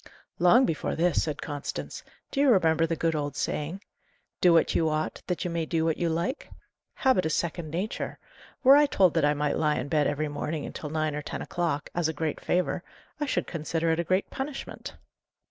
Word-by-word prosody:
"Long 230 Hz, +9 st, +6 dB
before 160 Hz, -, -2 dB
this," 170 Hz, 0 st, +2 dB
said 150 Hz, -2 st, -3 dB
Constance. 145 Hz, 0 st, -5 dB, 0.3 s
"Do 275 Hz, -, -2 dB
you 280 Hz, -1 st, +5 dB
remember 165 Hz, -6 st, +4 dB
the 165 Hz, -, -1 dB
good 165 Hz, +1 st, 0 dB
old 145 Hz, -2 st, -2 dB
saying, 165 Hz, +9 st, -3 dB, 0.6 s
'Do 180 Hz, -, +6 dB
what 165 Hz, -1 st, +4 dB
you 160 Hz, -1 st, +2 dB
ought, 155 Hz, 0 st, -2 dB
that 180 Hz, -1 st, -2 dB
you 175 Hz, -, -2 dB
may 165 Hz, -1 st, -2 dB
do 160 Hz, 0 st, 0 dB
what 160 Hz, -1 st, +1 dB
you 170 Hz, -, 0 dB
like'? 170 Hz, -, -2 dB, 0.5 s
Habit 260 Hz, -8 st, +3 dB
is 160 Hz, -, 0 dB
second 170 Hz, -1 st, -2 dB
nature. 180 Hz, +8 st, -3 dB, 0.5 s
Were 270 Hz, +1 st, +9 dB
I 295 Hz, 0 st, +6 dB
told 190 Hz, -, +3 dB
that -, -, +2 dB
I 150 Hz, 0 st, +3 dB
might 150 Hz, 0 st, 0 dB
lie 150 Hz, -1 st, +2 dB
in 140 Hz, -, -3 dB
bed 150 Hz, -1 st, +2 dB
every 150 Hz, +1 st, -1 dB
morning 150 Hz, +1 st, -3 dB
until 150 Hz, -, -6 dB
nine 155 Hz, 0 st, -1 dB
or 150 Hz, -, -3 dB
ten -, -, -5 dB
o'clock, 160 Hz, -5 st, -2 dB
as 175 Hz, -2 st, +1 dB
a -, -, -2 dB
great 160 Hz, -1 st, -2 dB
favour, 180 Hz, +1 st, 0 dB, 0.4 s
I 295 Hz, -, -1 dB
should -, -, 0 dB
consider 165 Hz, 0 st, -1 dB
it 160 Hz, -, 0 dB
a -, -, +1 dB
great 185 Hz, +3 st, +1 dB
punishment." 275 Hz, +1 st, -6 dB
165 Hz, 210 wpm, -27 LUFS, 155-180 Hz, 0.6 s, Were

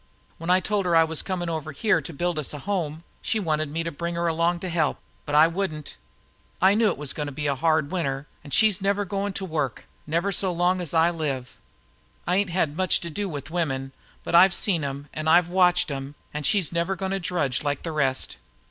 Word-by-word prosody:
When 165 Hz, +2 st, -5 dB
I 185 Hz, +1 st, +6 dB
told 205 Hz, -2 st, 0 dB
her 170 Hz, -, +3 dB
I 165 Hz, -, +7 dB
was 160 Hz, -1 st, -1 dB
coming 180 Hz, -2 st, -3 dB
over 160 Hz, -2 st, -3 dB
here 215 Hz, +9 st, +2 dB
to -, -, -7 dB
build 170 Hz, +2 st, -1 dB
us 150 Hz, 0 st, -2 dB
a -, -, -5 dB
home, 165 Hz, -3 st, -3 dB, 0.2 s
she 220 Hz, -, 0 dB
wanted 155 Hz, -5 st, -1 dB
me 165 Hz, +3 st, -2 dB
to 170 Hz, -, -3 dB
bring 170 Hz, +3 st, -4 dB
her 170 Hz, 0 st, -1 dB
along 170 Hz, +1 st, +1 dB
to 185 Hz, -, -3 dB
help; 160 Hz, -4 st, +1 dB, 0.3 s
but 145 Hz, -, -1 dB
I 155 Hz, +1 st, +8 dB
wouldn't. 165 Hz, -3 st, -3 dB, 0.6 s
I 190 Hz, +2 st, +5 dB
knew 220 Hz, +1 st, +3 dB
it -, -, 0 dB
was 145 Hz, -2 st, -3 dB
goin' 150 Hz, -1 st, -3 dB
to -, -, -5 dB
be 145 Hz, +2 st, -5 dB
hard 155 Hz, +2 st, +2 dB
this 145 Hz, -, -13 dB
winter, 140 Hz, -6 st, -2 dB, 0.2 s
and 145 Hz, -, -11 dB
she's 210 Hz, +1 st, +4 dB
never 200 Hz, +1 st, +1 dB
goin' 200 Hz, +1 st, -2 dB
to 190 Hz, -, -4 dB
work 150 Hz, -, -3 dB, 0.2 s
never 170 Hz, +6 st, 0 dB
so 190 Hz, 0 st, +2 dB
long 180 Hz, +1 st, +1 dB
as 170 Hz, -2 st, -4 dB
I 165 Hz, +1 st, +5 dB
live. 140 Hz, -7 st, -3 dB, 0.7 s
I 180 Hz, -, +1 dB
ain't 200 Hz, -1 st, +1 dB
had 165 Hz, -4 st, 0 dB
much 185 Hz, +1 st, +2 dB
to 170 Hz, -2 st, -6 dB
do 200 Hz, +4 st, -3 dB
with 145 Hz, -2 st, -6 dB
women, 135 Hz, -6 st, -2 dB, 0.3 s
but -, -, -5 dB
I've 180 Hz, +2 st, +7 dB
seen 175 Hz, -7 st, +2 dB
'em 140 Hz, +1 st, -5 dB
and 155 Hz, +1 st, -2 dB
I've 175 Hz, +1 st, +5 dB
watched 180 Hz, -3 st, +3 dB
'em 135 Hz, +1 st, -5 dB, 0.2 s
an' 150 Hz, -, -3 dB
she's 180 Hz, +2 st, +1 dB
never 170 Hz, +3 st, 0 dB
goin' 190 Hz, +1 st, -3 dB
to 195 Hz, -, 0 dB
drudge 165 Hz, -8 st, -1 dB
like 145 Hz, -2 st, -2 dB
the 165 Hz, -, -3 dB
rest. 135 Hz, -, 0 dB
165 Hz, 235 wpm, -25 LUFS, 150-185 Hz, 0.7 s, I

